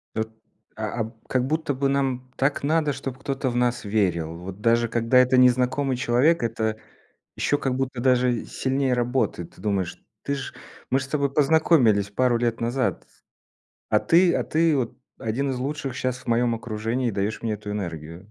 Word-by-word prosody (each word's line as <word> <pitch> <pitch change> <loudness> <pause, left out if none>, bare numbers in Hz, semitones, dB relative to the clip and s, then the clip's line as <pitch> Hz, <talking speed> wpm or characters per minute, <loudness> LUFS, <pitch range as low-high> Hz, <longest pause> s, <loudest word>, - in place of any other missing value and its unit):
От, 110 0 -1 0.5
а 110 - -3
а, - - +2
б 110 - -7 0.2
как 130 -1 +1
будто 155 +1 -1
бы 135 +1 0
нам 130 -2 -1
так 140 +1 0
надо, 150 0 +2
чтобы 130 -1 -6
кто-то 135 -1 -2
в 120 - -4
нас 120 0 +1
верил. 90 -6 0
Вот 95 +3 -8
даже 115 +1 +3
когда 115 +2 +2
это 125 0 +5
незнакомый 125 +2 +3
человек, 125 +8 +3
это 110 -1 -1 0.6
ещё 145 - +1
как 135 -3 -1
будто 130 -2 -2
даже 125 -2 +2
сильнее 135 -1 0
работает. 120 -8 -1
Ты - - -15
думаешь: 95 -4 -2 0.2
"Ты 140 - -1
ж 135 - -6 0.4
мы 135 - +2
же 135 - -4
с - - -13
тобой 140 -1 -1
познакомились 140 - +4
пару 120 +3 +2
лет 115 -1 -1
назад, 120 +2 -1 0.8
а - - +4
ты 175 +1 +4
а - - +1
ты 160 -1 +2
вот 125 -4 -2 0.2
один 130 +5 -1
из 130 - -2
лучших 140 0 -3
щас 130 0 -2
в - - -17
моём 120 0 +2
окружении 115 +2 -2
и - - 0
даёшь 100 +2 -2
мне 115 -2 -1
эту 105 0 -7
энергию". 85 -1 -6
125 Hz, 185 wpm, -24 LUFS, 110-135 Hz, 0.8 s, это